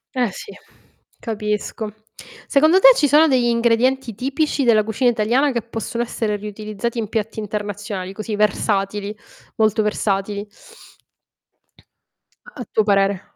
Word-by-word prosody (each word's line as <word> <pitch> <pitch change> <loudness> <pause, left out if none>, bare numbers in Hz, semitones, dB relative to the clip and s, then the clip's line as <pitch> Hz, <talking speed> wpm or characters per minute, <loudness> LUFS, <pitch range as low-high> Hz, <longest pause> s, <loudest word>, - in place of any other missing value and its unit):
Eh, 245 -4 +1
sì, 415 - -9 0.7
capisco. 210 -1 -3 0.6
Secondo 310 +6 +4
te, - - +9
ci 290 - +2
sono 305 +4 +5
degli 255 -4 +2
ingredienti 235 +1 +1
tipici 275 +5 -1
della 220 -3 +4
cucina 230 +3 +1
italiana 240 +5 +1
che 235 -3 -2
possono 235 +1 -4
essere 220 -3 -2
riutilizzati 210 +2 -5
in 215 -2 -3
piatti 220 0 -3
internazionali 205 -2 -5
così 215 +1 -4
versatili, 205 0 0 0.4
molto 215 0 +2
versatili? 205 -1 -1 2.0
A 245 - -9
tuo 220 - 0
parere. 195 -2 +2
220 Hz, 120 wpm, -20 LUFS, 210-240 Hz, 2.0 s, te